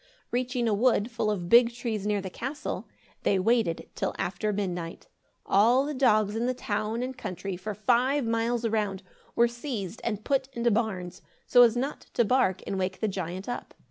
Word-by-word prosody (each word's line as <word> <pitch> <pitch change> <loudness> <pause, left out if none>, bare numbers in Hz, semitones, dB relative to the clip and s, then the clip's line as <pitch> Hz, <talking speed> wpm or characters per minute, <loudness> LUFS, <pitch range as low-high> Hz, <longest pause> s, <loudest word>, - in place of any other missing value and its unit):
Reaching 245 0 0
a 220 - +2
wood 230 +1 +2
full 230 -2 -1
of 185 -5 -2
big 235 +3 +6
trees 220 -4 -3
near 205 -1 +1
the 190 -1 -6
castle, 265 +9 -5 0.3
they 195 - +2
waited 215 -3 +1
till - - -2
after 195 +3 -1
midnight. 180 -4 -4 0.4
All 235 +7 +4
the 300 - -3
dogs 215 -6 +3
in 235 +2 0
the 255 - 0
town 215 +1 -2
and 260 +1 -4
country, 190 -1 -5
for 200 +4 -5
five 250 +6 +2
miles 230 +1 0
around, 210 -4 -1 0.3
were 235 - +5
seized 235 - -5
and 215 -2 -2
put 270 -2 +1
into 235 -1 +1
barns, 195 -5 -2 0.2
so 245 - +6
as 240 -1 +6
not 275 +4 -3
to 235 - +4
bark 205 -6 +2
and 195 - -2
wake 185 0 -2
the 220 - 0
giant 185 -1 -4
up. 245 - -5
225 Hz, 185 wpm, -28 LUFS, 195-245 Hz, 0.4 s, big